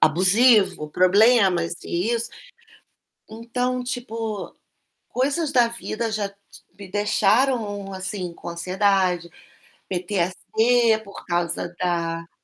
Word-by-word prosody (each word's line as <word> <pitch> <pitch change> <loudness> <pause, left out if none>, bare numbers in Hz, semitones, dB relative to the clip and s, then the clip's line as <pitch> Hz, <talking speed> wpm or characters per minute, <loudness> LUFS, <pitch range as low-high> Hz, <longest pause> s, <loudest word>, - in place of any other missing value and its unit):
abusivo, 190 0 +4
problemas 185 -2 +4
e 185 +8 -1
isso. 230 0 -2 1.0
Então, 245 +3 -3
tipo, 225 -4 -5 0.6
coisas 285 +4 0
da 240 -2 +4
vida 230 -1 -3
já 205 -2 -2
t 200 - -24 0.4
me 200 -2 -10
deixaram, 205 0 +1
assim, 190 -2 -4
com 170 - -9
ansiedade, 180 0 0 0.6
PTSC 215 +5 +1
por 200 -1 -12
causa 175 0 -2
da 170 -2 -2
200 Hz, 95 wpm, -23 LUFS, 180-230 Hz, 1.0 s, abusivo